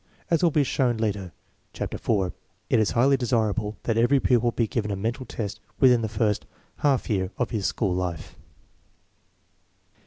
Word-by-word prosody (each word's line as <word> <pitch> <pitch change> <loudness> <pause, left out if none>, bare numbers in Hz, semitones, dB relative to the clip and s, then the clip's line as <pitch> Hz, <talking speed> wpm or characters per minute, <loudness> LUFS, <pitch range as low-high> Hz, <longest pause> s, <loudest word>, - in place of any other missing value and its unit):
As 165 - +3
will 175 - +5
be 150 -2 +2
shown 125 -3 +1
later 100 -5 -2 0.4
(chapter - - -4
IV), 95 -5 0 0.4
it - - +5
is 110 - +2
highly 135 +4 +3
desirable 110 -3 0
that 115 -1 0
every 135 +4 +4
pupil 120 -2 +2
be 115 - 0
given 105 -1 -2
a 100 - -1
mental 115 +6 -3
test 105 -1 -5 0.2
within 125 -3 +5
the 110 - -2
first 105 -1 0 0.3
half 140 -3 +1
year 95 -5 0
of 125 - -1
his 105 -4 0
school 100 -6 0
life. 90 -3 -4
115 Hz, 165 wpm, -25 LUFS, 105-125 Hz, 0.4 s, will